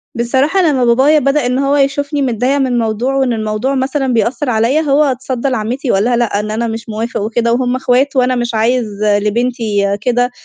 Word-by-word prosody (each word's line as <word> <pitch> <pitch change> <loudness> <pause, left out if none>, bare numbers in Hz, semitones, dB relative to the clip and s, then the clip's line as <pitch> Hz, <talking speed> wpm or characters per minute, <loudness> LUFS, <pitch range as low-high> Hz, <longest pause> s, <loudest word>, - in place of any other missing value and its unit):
بصراحة 265 +10 +1
لمّا 280 -7 +2
بابايا 265 +6 +4
بدأ 275 0 +1
إن 250 +1 0
هو 275 +1 +1
يشوفني 285 +1 0
متضايقة 255 +2 0
من 255 -3 0
موضوع 230 +4 -1
وإن 265 -3 +1
الموضوع 220 +4 -2
مثلًا 265 0 -1
بيأثّر 240 +4 0
عليّا، 235 +7 +1
هو 295 -1 +2
اتصدّى 260 -1 -2
لعمّتي 250 +2 -2
وقال 195 - +2
لها: 240 +1 +1
"لأ،" 230 -4 0
إن 215 0 -4
أنا 230 +2 -2
مش 225 0 -6
موافق 220 +1 -3
وكده 230 +2 0
وهم 250 0 0
أخوات 260 +2 +1
وأنا 255 0 +2
مش 240 -1 -2
عايز 235 +2 +1 0.2
لبنتي 210 -1 0
كده. 245 +1 0
245 Hz, 190 wpm, -14 LUFS, 225-270 Hz, 0.2 s, بابايا